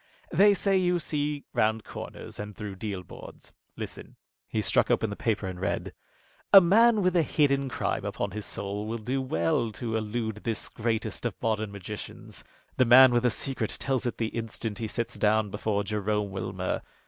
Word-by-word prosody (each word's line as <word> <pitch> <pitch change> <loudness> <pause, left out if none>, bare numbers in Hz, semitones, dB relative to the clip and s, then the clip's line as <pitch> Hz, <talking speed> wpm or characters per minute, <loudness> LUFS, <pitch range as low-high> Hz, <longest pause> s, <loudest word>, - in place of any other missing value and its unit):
"They 205 0 +6
say 195 0 +2
you 180 -1 +2
see 150 -3 -2
round 110 0 +1
corners - - -9
and 105 0 -6
through 100 -2 -6
deal 100 -2 -4
boards. - - -12 0.2
Listen." - - -8 0.3
He - - -1
struck - - +2
open 110 -2 +1
the - - -4
paper 110 -3 -1
and 90 -1 -5
read: 95 - -2 0.6
"'A 195 - +12
man 215 +4 +5
with 185 0 +2
a 170 - +5
hidden 140 -2 +1
crime - - -2
upon - - -3
his 105 0 -5
soul 100 +2 -4
will 115 +1 -2
do 125 +5 -2
well 130 -3 0
to 115 0 -3
elude 110 0 -2
this 110 0 -3
greatest 115 -1 -2
of - - -3
modern 110 -2 -1
magicians. 100 +1 -8 0.3
The 130 - +5
man 130 +2 +9
with 120 +1 +2
a - - +5
secret 125 -2 -3
tells 130 -2 0
it 120 - -3
the 115 -1 -1
instant 115 -1 -4
he 115 - -2
sits 115 +2 -4
down 105 -1 +2
before 105 0 -1
Jerome 105 0 -1
Wilmer. 95 -1 -3
110 Hz, 185 wpm, -28 LUFS, 105-135 Hz, 0.6 s, A